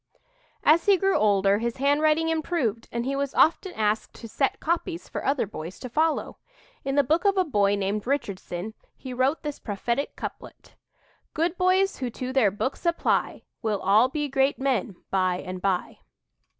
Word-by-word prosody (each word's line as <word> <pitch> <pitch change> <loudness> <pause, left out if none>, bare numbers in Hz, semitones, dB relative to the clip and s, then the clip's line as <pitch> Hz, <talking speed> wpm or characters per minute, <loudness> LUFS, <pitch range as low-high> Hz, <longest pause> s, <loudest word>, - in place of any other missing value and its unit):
As 330 +4 +4
he 400 -2 +6
grew 390 +2 +2
older 200 -1 +3
his 235 0 -2
handwriting 305 +4 +2
improved 310 -9 -1
and 235 0 -2
he 275 +1 -1
was 280 -1 -2
often 335 +4 +3
asked 215 0 -1
to 230 - -9
"set 270 +5 -1
copies" 340 +1 -2
for - - -5
other 275 -2 +1
boys 180 -3 -8
to 255 - -7
follow. 310 +5 0 0.5
In 270 0 -2
the 285 - +5
book 320 +4 +1
of 400 -1 +2
a 375 - +4
boy 205 -8 +2
named 205 +2 -2
Richardson, 200 -6 -3 0.2
he 260 -2 -7
wrote 260 +6 +1
this 295 -2 -5
prophetic 235 +6 -2
couplet: - - -9 0.6
"Good 335 +3 0
boys 370 +2 +2
who 255 -2 -3
to 255 +2 -5
their 255 -7 +4
books 210 +8 -3
apply 340 -1 0 0.2
Will 215 -3 -1
all 210 +7 +4
be 295 +1 -2
great 270 0 +1
men 255 -8 -1 0.2
by 185 -2 +2
and 185 0 -6
by." 190 -2 -1
265 Hz, 175 wpm, -26 LUFS, 210-310 Hz, 0.6 s, he